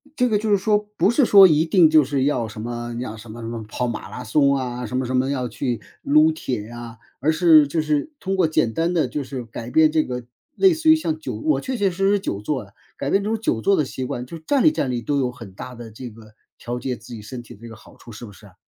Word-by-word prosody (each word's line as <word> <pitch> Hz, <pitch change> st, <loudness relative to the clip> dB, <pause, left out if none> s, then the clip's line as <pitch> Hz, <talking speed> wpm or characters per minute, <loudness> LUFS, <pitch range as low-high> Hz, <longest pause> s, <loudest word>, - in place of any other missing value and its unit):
这 250 Hz, -, +2 dB
个 215 Hz, -3 st, +2 dB
就 215 Hz, +1 st, -2 dB
是 200 Hz, -, +4 dB
说， 210 Hz, +2 st, +2 dB, 0.2 s
不 185 Hz, +5 st, +3 dB
是 270 Hz, +1 st, +3 dB
说 195 Hz, -3 st, +8 dB
一 155 Hz, 0 st, +3 dB
定 170 Hz, -1 st, +5 dB
就 155 Hz, -1 st, +6 dB
是 135 Hz, -1 st, -1 dB
要 125 Hz, -5 st, 0 dB
什 110 Hz, 0 st, -8 dB
么 120 Hz, 0 st, -5 dB
要 115 Hz, -3 st, -5 dB
什 110 Hz, 0 st, -11 dB
么 120 Hz, -, -9 dB
什 115 Hz, -, -6 dB
么 115 Hz, -1 st, -5 dB
跑 125 Hz, +3 st, -2 dB
马 110 Hz, -4 st, -5 dB
拉 125 Hz, +4 st, -7 dB
松 140 Hz, +4 st, +3 dB
啊， 125 Hz, -2 st, -4 dB
什 125 Hz, -, -3 dB
么 130 Hz, -, -1 dB
什 130 Hz, +1 st, -2 dB
么 130 Hz, +1 st, +1 dB
要 130 Hz, -3 st, -2 dB
去 120 Hz, -1 st, -3 dB, 0.2 s
撸 305 Hz, +3 st, +4 dB
铁 125 Hz, -, -4 dB
啊。 120 Hz, -1 st, -9 dB, 0.2 s
而 150 Hz, +5 st, +2 dB
是 160 Hz, -3 st, +6 dB
就 155 Hz, +3 st, -1 dB
是 155 Hz, -, -1 dB
通 195 Hz, 0 st, -2 dB
过 180 Hz, -4 st, +3 dB
简 115 Hz, -7 st, +1 dB
单 165 Hz, +5 st, 0 dB
的， 160 Hz, -7 st, +1 dB
就 140 Hz, +3 st, -4 dB
是 130 Hz, -1 st, -6 dB
改 115 Hz, +1 st, -8 dB
变 155 Hz, +3 st, +4 dB
这 155 Hz, 0 st, +2 dB
个 125 Hz, -3 st, -6 dB, 0.3 s
类 385 Hz, -3 st, +5 dB
似 320 Hz, 0 st, +1 dB
于 315 Hz, -, +8 dB
像 315 Hz, 0 st, -2 dB
久 -, -, -5 dB
我 310 Hz, 0 st, 0 dB
确 260 Hz, -1 st, -4 dB
确 200 Hz, -3 st, +2 dB
实 195 Hz, +2 st, 0 dB
实 205 Hz, 0 st, +3 dB
久 100 Hz, -, -4 dB
坐 130 Hz, 0 st, -3 dB
呀， 100 Hz, -, -21 dB, 0.3 s
改 140 Hz, -, -3 dB
变 200 Hz, 0 st, +2 dB
这 210 Hz, -, -2 dB
种 225 Hz, 0 st, -1 dB
久 120 Hz, -, -1 dB
坐 200 Hz, -, +3 dB
的 150 Hz, -, +1 dB
习 130 Hz, -, -6 dB
惯， 125 Hz, 0 st, -4 dB
就 165 Hz, -, -9 dB
是 160 Hz, -, -18 dB
站 280 Hz, -3 st, +2 dB
立 310 Hz, -, +6 dB
站 135 Hz, -, -2 dB
立 120 Hz, -1 st, -2 dB
都 140 Hz, +4 st, -1 dB
有 125 Hz, -2 st, 0 dB
很 115 Hz, -6 st, -12 dB
大 125 Hz, +6 st, -9 dB
的 115 Hz, -1 st, -10 dB
这 120 Hz, +3 st, -8 dB
个， 110 Hz, -1 st, -16 dB, 0.2 s
调 120 Hz, +1 st, -5 dB
节 125 Hz, 0 st, -3 dB
自 120 Hz, +2 st, -12 dB
己 110 Hz, -, -8 dB
身 120 Hz, +4 st, -8 dB
体 120 Hz, -, -13 dB
的 105 Hz, -, -18 dB
这 115 Hz, -, -9 dB
个 110 Hz, -, -10 dB
好 110 Hz, -, -17 dB
处， 120 Hz, -, -14 dB
是 110 Hz, +2 st, -9 dB
不 105 Hz, -, -11 dB
是 105 Hz, +1 st, -16 dB
啊？ 95 Hz, -, -19 dB
130 Hz, 320 characters per minute, -22 LUFS, 120-180 Hz, 0.3 s, 说